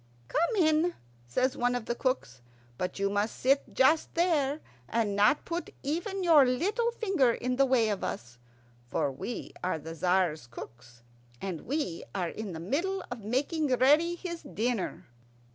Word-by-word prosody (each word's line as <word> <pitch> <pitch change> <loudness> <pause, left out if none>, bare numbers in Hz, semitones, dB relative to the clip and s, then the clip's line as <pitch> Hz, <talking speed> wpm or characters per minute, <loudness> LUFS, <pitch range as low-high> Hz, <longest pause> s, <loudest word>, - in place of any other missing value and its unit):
"Come 340 +9 +1
in," 320 0 +3 0.3
says 255 - +1
one 245 0 +1
of 245 -3 -3
the 235 - -1
cooks. 240 - -2 0.4
"But 180 - -2
you 200 0 +1
must 205 +2 0
sit 275 +2 +1
just 305 +5 +3
there, 310 -5 +2 0.3
and 220 -3 0
not 210 +8 +3
put 340 +1 -3
even 350 +7 -2
your 320 -5 +7
little 390 - +1
finger 385 - +2
in 250 +1 -2
the 275 0 +4
way 250 -4 +3
of 205 -2 -2
us; 120 +1 -5 0.5
for 135 - 0
we 220 - -6
are 180 -2 0
the 160 +2 -8
Tzar's 175 -5 +1
cooks, 120 0 -11 0.4
and 185 -5 -5
we 270 - -2
are 180 -3 -1
in 210 -1 -6
the 160 - -6
middle 340 - -1
of 240 -4 -6
making 285 - 0
ready 295 +7 +4
his 340 -1 -6
dinner." 240 -6 -2
255 Hz, 160 wpm, -29 LUFS, 195-315 Hz, 0.5 s, your